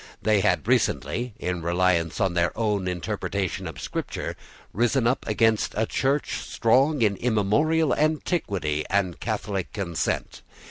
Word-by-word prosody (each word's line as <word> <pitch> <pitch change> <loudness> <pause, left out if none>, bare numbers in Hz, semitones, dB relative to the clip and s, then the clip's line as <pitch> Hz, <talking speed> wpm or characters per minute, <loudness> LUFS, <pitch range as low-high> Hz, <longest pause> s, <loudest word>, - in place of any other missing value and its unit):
They 105 -2 +2
had 95 0 +1
recently, 120 -1 0
in 90 0 -3
reliance 85 -1 +1
on 95 -4 +1
their 85 +2 0
own 105 -4 0
interpretation 95 0 -3
of 80 - -8
Scripture, - - -4 0.4
risen 120 +4 +2
up 125 +3 +1
against 110 -2 +2
a 110 - +2
Church 135 +5 0
strong 130 +4 +2
in 100 -2 +3
immemorial 125 +8 +2
antiquity 110 - 0
and 95 -3 0
catholic 105 -4 -3
consent. 90 -5 -2
105 Hz, 130 wpm, -25 LUFS, 90-120 Hz, 0.4 s, in